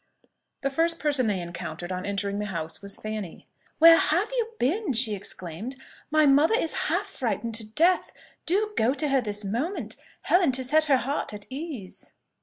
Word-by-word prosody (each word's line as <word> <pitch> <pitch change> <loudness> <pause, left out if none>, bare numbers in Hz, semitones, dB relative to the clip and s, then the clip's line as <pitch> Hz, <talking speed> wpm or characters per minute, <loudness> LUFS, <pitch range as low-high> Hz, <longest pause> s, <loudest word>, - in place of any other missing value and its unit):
The 275 - -1
first 330 +4 +2
person 285 -6 +1
they 200 -3 0
encountered 175 +1 -6
on 185 +1 -4
entering 200 0 -2
the 210 - -2
house 165 -4 -5
was 200 0 -6
Fanny. 215 -5 -6 0.3
"Where 330 +1 +9
have 360 +9 +2
you 470 -2 -2
been!" 340 - 0
she 230 -2 +2
exclaimed. 195 +4 -6 0.3
"My 310 0 +4
mother 290 +9 +5
is 330 - -1 0.2
half - - +1
frightened 230 -1 -3
to 220 -1 -3
death. 335 +11 +2 0.4
Do 420 +5 +1
go 245 +5 +2
to 300 0 -1
her 270 -1 +3
this 210 -2 -4
moment, 235 - -3 0.3
Helen, 335 -3 +3
to 260 +1 0
set 310 +5 +3
her 280 -3 +4
heart 260 -4 -3
at 205 - -10
ease." 270 - -7
260 Hz, 180 wpm, -26 LUFS, 205-315 Hz, 0.4 s, Where